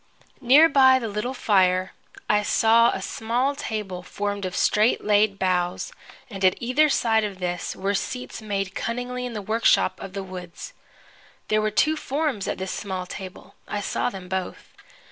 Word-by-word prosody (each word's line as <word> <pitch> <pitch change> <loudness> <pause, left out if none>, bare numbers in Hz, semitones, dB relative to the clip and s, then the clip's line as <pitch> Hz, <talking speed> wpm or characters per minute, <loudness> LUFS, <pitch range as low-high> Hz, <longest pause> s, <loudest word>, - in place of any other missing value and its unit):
Near 280 +6 +7
by 265 -3 +6
the 235 -3 -3
little 210 +5 -3
fire 185 -5 +2 0.4
I 210 0 +3
saw 225 +2 +4
a 190 - -3
small 240 +7 -1
table 210 -9 -4
formed 205 +1 -4
of 185 - -4
straight 215 +3 +2
laid 205 -1 +3
boughs, 180 - -1 0.3
and 195 -4 -7
at 185 -1 +5
either 265 +6 +2
side 225 -5 +2
of 205 -3 -4
this 180 -1 -3
were 195 +2 -1
seats 250 +4 -4
made 195 -3 -3
cunningly 250 +1 -3
in 240 - -7
the 210 -2 -5
workshop 225 +3 +2
of 195 -1 -8
the 195 -1 -4
woods. 180 -2 -9 0.8
There 215 0 +2
were 215 - +1
two 305 +9 +2
forms 285 -8 -2
at - - -2
this 190 0 -4
small 190 -3 -4
table. 185 +1 -9
I 205 - -3
saw 205 - -1
them 190 -5 -9
both. 190 0 -5
210 Hz, 170 wpm, -24 LUFS, 190-240 Hz, 0.8 s, Near